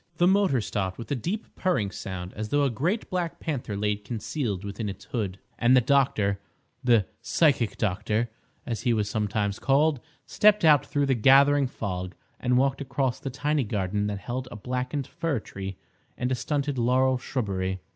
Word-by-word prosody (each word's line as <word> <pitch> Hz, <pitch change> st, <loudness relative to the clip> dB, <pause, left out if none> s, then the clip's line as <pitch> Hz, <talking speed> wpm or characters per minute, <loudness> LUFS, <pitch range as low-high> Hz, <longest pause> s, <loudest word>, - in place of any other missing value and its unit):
The 175 Hz, -, +4 dB
motor 190 Hz, -, +3 dB
stopped 95 Hz, -3 st, -2 dB
with 115 Hz, -, -8 dB
a -, -, +2 dB
deep 185 Hz, -, -3 dB
purring 145 Hz, -, 0 dB
sound, 95 Hz, -2 st, -6 dB
as 105 Hz, +1 st, -5 dB
though 145 Hz, +3 st, +2 dB
a 140 Hz, -, +2 dB
great 170 Hz, -, -1 dB
black 170 Hz, -2 st, -2 dB
panther 120 Hz, -, -3 dB
lay 105 Hz, 0 st, +1 dB
concealed 105 Hz, -, -3 dB
within 105 Hz, +1 st, -4 dB
its 100 Hz, -, -8 dB
hood, 100 Hz, -5 st, -3 dB, 0.2 s
and 125 Hz, +2 st, +5 dB
the -, -, +8 dB
doctor—the 115 Hz, -3 st, +1 dB, 0.2 s
"psychic 125 Hz, -2 st, +2 dB
doctor," 105 Hz, +3 st, 0 dB, 0.4 s
as 115 Hz, -2 st, -3 dB
he 120 Hz, -2 st, +2 dB
was 105 Hz, -2 st, 0 dB
sometimes 105 Hz, -2 st, -1 dB
called—stepped 155 Hz, -, +2 dB
out 150 Hz, -3 st, +6 dB
through 145 Hz, -1 st, +1 dB
the 135 Hz, -, +2 dB
gathering 135 Hz, +3 st, +5 dB
fog, 90 Hz, -6 st, -4 dB, 0.2 s
and 125 Hz, 0 st, +2 dB
walked 135 Hz, +1 st, +2 dB
across 130 Hz, -1 st, -1 dB
the 135 Hz, -, -4 dB
tiny 145 Hz, +2 st, 0 dB
garden 105 Hz, -1 st, -1 dB
that 105 Hz, -1 st, -2 dB
held 125 Hz, +5 st, -4 dB
a 120 Hz, -, -8 dB
blackened 125 Hz, +5 st, -3 dB
fir 155 Hz, -3 st, -2 dB
tree 95 Hz, -2 st, -7 dB, 0.4 s
and 125 Hz, +1 st, -1 dB
a -, -, +3 dB
stunted 140 Hz, +1 st, -1 dB
laurel 130 Hz, +2 st, +3 dB
shrubbery. 95 Hz, -9 st, -2 dB
125 Hz, 170 wpm, -26 LUFS, 105-140 Hz, 0.4 s, the